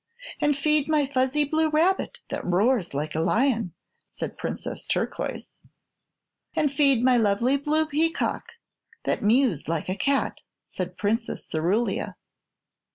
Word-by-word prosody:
"And 295 -1 +2
feed 300 0 +2
my 300 -2 +3
fuzzy 265 +2 +1
blue 315 +2 +1
rabbit 335 +5 +1
that - - -3
roars 190 - +1
like 150 +2 -2
a 155 - -1
lion," 225 +2 +1 0.4
said - - -5
Princess - - -5
Turquoise. - - -3 1.0
"And 295 -2 +2
feed 275 -4 +3
my 255 -1 +5
lovely 230 +4 +2
blue 300 +3 +1
peacock 315 +2 -1 0.5
that - - -1
mews 215 - +2
like 165 +1 -2
a 185 - 0
cat," 275 +6 0 0.3
said - - -5
Princess 225 +3 -1
Cerulia. 180 +9 0
260 Hz, 130 wpm, -25 LUFS, 205-295 Hz, 1.0 s, my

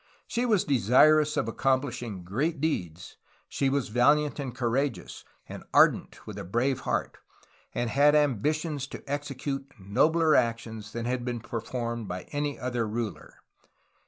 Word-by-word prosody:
She 245 +1 -1
was 210 -6 +3
desirous 150 +4 +4
of - - 0
accomplishing 120 -5 -1
great 140 - -1
deeds, 90 - -3 0.3
she 135 - 0
was 140 -4 -1
valiant 145 +6 +3
and 130 -4 -4
courageous 120 -5 -2 0.2
and - - -8
ardent - - +3
with - - -7
a - - -5
brave 120 +8 0
heart, - - -2 0.6
and 120 - 0
had 145 +5 +4
ambitions 150 +1 0
to - - -9
execute 140 -1 -4
nobler 155 - +3
actions 115 -2 0
than 115 0 -4
had 125 0 -1
been 120 -1 -3
performed 115 0 -4
by 90 0 -5
any 145 0 -2
other 120 -3 -2
ruler." 110 0 -5
130 Hz, 140 wpm, -28 LUFS, 115-145 Hz, 0.6 s, desirous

